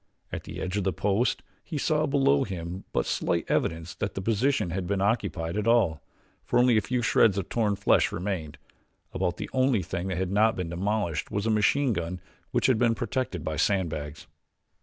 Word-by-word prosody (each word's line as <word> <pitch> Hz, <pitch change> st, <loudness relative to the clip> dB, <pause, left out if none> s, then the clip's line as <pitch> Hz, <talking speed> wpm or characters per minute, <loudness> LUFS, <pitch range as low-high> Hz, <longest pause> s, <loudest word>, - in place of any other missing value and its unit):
At -, -, -5 dB
the -, -, -7 dB
edge 95 Hz, +2 st, -3 dB
of 100 Hz, -, 0 dB
the 95 Hz, -, +1 dB
post 105 Hz, +5 st, 0 dB, 0.2 s
he 160 Hz, -, -5 dB
saw 155 Hz, +1 st, +1 dB
below 135 Hz, -, +3 dB
him 90 Hz, -1 st, -6 dB
but -, -, 0 dB
slight -, -, 0 dB
evidence 80 Hz, +1 st, -1 dB
that 100 Hz, -, -4 dB
the 95 Hz, -, -3 dB
position 115 Hz, -2 st, +1 dB
had 90 Hz, 0 st, -3 dB
been 100 Hz, 0 st, 0 dB
occupied 100 Hz, -5 st, 0 dB
at 105 Hz, +1 st, -1 dB
all, 110 Hz, -10 st, +3 dB, 0.4 s
for -, -, 0 dB
only 125 Hz, -1 st, +5 dB
a 110 Hz, -, +4 dB
few 125 Hz, +1 st, -1 dB
shreds 105 Hz, -3 st, +4 dB
of 100 Hz, -, -3 dB
torn 105 Hz, -4 st, +1 dB
flesh 100 Hz, -, +3 dB
remained. 85 Hz, -6 st, -4 dB, 0.6 s
About 90 Hz, -1 st, -1 dB
the -, -, -4 dB
only 130 Hz, -6 st, +2 dB
thing 90 Hz, +2 st, -4 dB
that 95 Hz, -3 st, -2 dB
had 95 Hz, 0 st, -1 dB
not 110 Hz, +3 st, +3 dB
been 90 Hz, -3 st, -3 dB
demolished 90 Hz, -2 st, -1 dB
was 100 Hz, +1 st, -2 dB
a 115 Hz, -, +2 dB
machine 120 Hz, +5 st, +3 dB
gun 85 Hz, 0 st, -3 dB, 0.3 s
which -, -, 0 dB
had 130 Hz, -4 st, +3 dB
been 115 Hz, -2 st, +3 dB
protected 115 Hz, -, -3 dB
by 80 Hz, -1 st, -3 dB
sand 95 Hz, -5 st, +1 dB
bags. 75 Hz, +1 st, -6 dB
100 Hz, 200 wpm, -27 LUFS, 85-115 Hz, 0.6 s, only